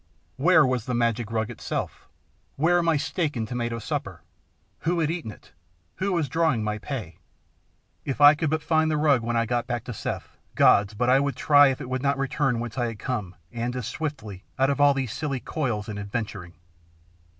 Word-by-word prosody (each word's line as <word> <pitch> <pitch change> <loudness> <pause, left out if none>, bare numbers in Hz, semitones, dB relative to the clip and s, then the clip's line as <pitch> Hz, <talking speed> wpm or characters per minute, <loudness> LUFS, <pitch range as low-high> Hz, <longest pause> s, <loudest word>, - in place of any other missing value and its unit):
Where 160 +2 +5
was 125 -3 -1
the 125 - -2
magic 115 -1 0
rug 110 -1 -1
itself? - - -5 0.5
Where 175 +4 +3
my 165 -2 +2
steak 150 0 -2
and 110 -2 -2
tomato 120 -1 -3
supper? 115 - -5 0.6
Who 170 +1 0
had 160 -1 +1
eaten 165 -9 -4
it? 105 - -13 0.5
Who 195 +1 -1
was 165 -5 0
drawing 160 -9 +1
my 105 0 -2
pay? 105 - -6 0.8
If 135 - -4
I 145 0 +9
could 155 0 -1
but 160 0 -1
find 160 -1 +2
the 155 - +1
rug 145 -5 +3
when 120 +1 -1
I 115 - +2
got 120 +1 -1
back 120 -2 -3
to 120 - -6
Seth, - - -6 0.2
gods! 105 +1 +4
but 120 +4 0
I 135 - +6
would 140 0 -1
try 145 -1 +6
if 135 -1 -1
it - - -6
would 130 0 -2
not 140 0 +1
return 135 -2 0
whence 120 +2 -5
I 120 - +1
had 115 -2 -6
come, 105 -6 -4 0.2
and 120 +1 -3
as 125 -3 -4
swiftly, 130 -12 -5
out 135 +1 +3
of 140 - -1
all 145 -1 +5
these 130 -5 -2
silly 140 -4 -3
coils 120 -8 -3
and 105 -2 -5
adventuring. 100 -4 -5
130 Hz, 205 wpm, -25 LUFS, 115-150 Hz, 0.8 s, I